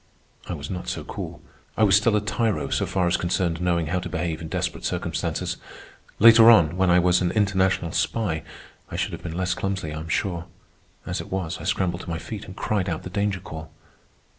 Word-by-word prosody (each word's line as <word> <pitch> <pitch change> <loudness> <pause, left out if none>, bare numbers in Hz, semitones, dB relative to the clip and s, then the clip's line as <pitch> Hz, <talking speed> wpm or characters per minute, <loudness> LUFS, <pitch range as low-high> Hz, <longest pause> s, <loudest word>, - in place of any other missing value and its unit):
I - - -3
was 70 -3 -6
not 90 -1 -5
so - - -3
cool. - - -7 0.3
I 110 - +4
was 100 -2 +6
still 105 +1 +4
a 105 - +2
tyro 105 +1 -1
so - - +1
far 95 -2 +1
as 85 +1 +2
concerned 85 -1 -1
knowing 85 -2 +1
how 90 +4 -1
to 90 0 -6
behave 85 -2 -2
in 80 - -5
desperate - - -3
circumstances. - - -2 0.6
Later 115 +1 +9
on, 85 -8 +6
when 95 0 +2
I 90 - +6
was 90 0 +4
an 90 - +2
international 95 -4 +1
spy, 90 -7 0 0.5
I - - -6
should - - -1
have - - -6
been 80 - -5
less 90 -1 0
clumsy, 95 -5 -3
I 80 - -4
am 80 - -7
sure. 85 0 -1 0.6
As - - -3
it - - -11
was, 95 -1 -2
I - - -7
scrambled 90 -1 0
to - - -9
my 85 - -2
feet 105 +5 -7
and 95 - -10
cried 100 -3 -1
out 85 - -3
the 90 - -7
danger 100 -1 -1
call. 80 0 -8
90 Hz, 215 wpm, -24 LUFS, 85-100 Hz, 0.6 s, Later